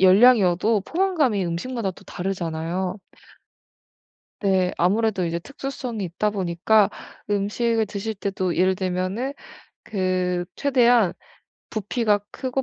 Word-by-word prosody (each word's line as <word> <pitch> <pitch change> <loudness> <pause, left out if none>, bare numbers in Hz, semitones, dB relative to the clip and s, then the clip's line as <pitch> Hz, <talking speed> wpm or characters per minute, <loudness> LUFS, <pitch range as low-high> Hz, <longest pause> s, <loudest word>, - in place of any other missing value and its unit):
열량이어도 200 0 +5
포만감이 300 - +1
음식마다 195 +5 -2
또 185 - -14
다르잖아요? 180 0 -3 1.4
네. 190 -3 +2
아무래도 200 +1 +2
이제 170 0 -1
특수성이 255 -1 -5
있다 185 +4 -1
보니까 195 +2 +2 0.4
음식을 220 +3 +1
드실 210 +2 -4
때도 190 -3 -2
예를 185 +2 +3
들면은 185 +7 -2 0.5
그 185 -3 -1
최대한 245 -8 +4 0.6
부피가 215 -1 0
크고 265 0 -2
200 Hz, 265 characters per minute, -23 LUFS, 185-230 Hz, 1.4 s, 열량이어도